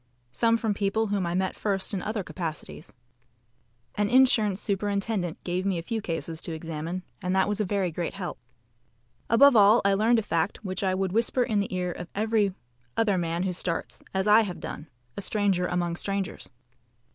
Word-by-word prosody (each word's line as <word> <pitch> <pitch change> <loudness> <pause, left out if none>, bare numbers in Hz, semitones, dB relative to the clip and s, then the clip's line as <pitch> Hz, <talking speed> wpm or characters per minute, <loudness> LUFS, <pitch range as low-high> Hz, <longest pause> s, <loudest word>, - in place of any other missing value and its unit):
Some 230 - +2
from 225 -2 0
people 205 +2 0
whom 190 -4 0
I 170 - -2
met 190 0 0
first 195 -1 +1
in 190 - -1
other 210 0 -3
capacities. 165 -1 -6 1.0
An 205 0 0
insurance 225 -6 +4
superintendent 200 -3 -2
gave 180 +1 -1
me 195 -2 0
a 165 - -4
few 220 +5 -3
cases 165 -2 -4
to 165 - -4
examine, 165 +3 -5 0.2
and 180 0 -1
that 190 - +3
was 210 +1 -1
a - - +1
very 190 -2 0
great 170 +2 -3
help. 180 -9 -5 0.9
Above 265 +4 +7
all, 210 +2 +7
I 200 - +4
learned 220 +4 +3
a 225 - +1
fact 185 +4 -1
which 185 -1 -3
I 185 -1 +1
would 190 -1 -1
whisper 230 +4 +2
in 215 -3 0
the 200 - -2
ear 180 -1 -1
of 180 0 -7
every 210 -2 +1 0.4
other 205 -5 +2
man 170 +1 -1
who 190 -1 -1
starts, 170 -1 -3
as 190 0 0
I 210 +2 +7
have 195 -5 -4
done, 150 - -7 0.3
a - - -4
stranger 195 -3 +1
among 175 -1 -1
strangers. 195 +1 -3
195 Hz, 190 wpm, -27 LUFS, 180-210 Hz, 1.0 s, Above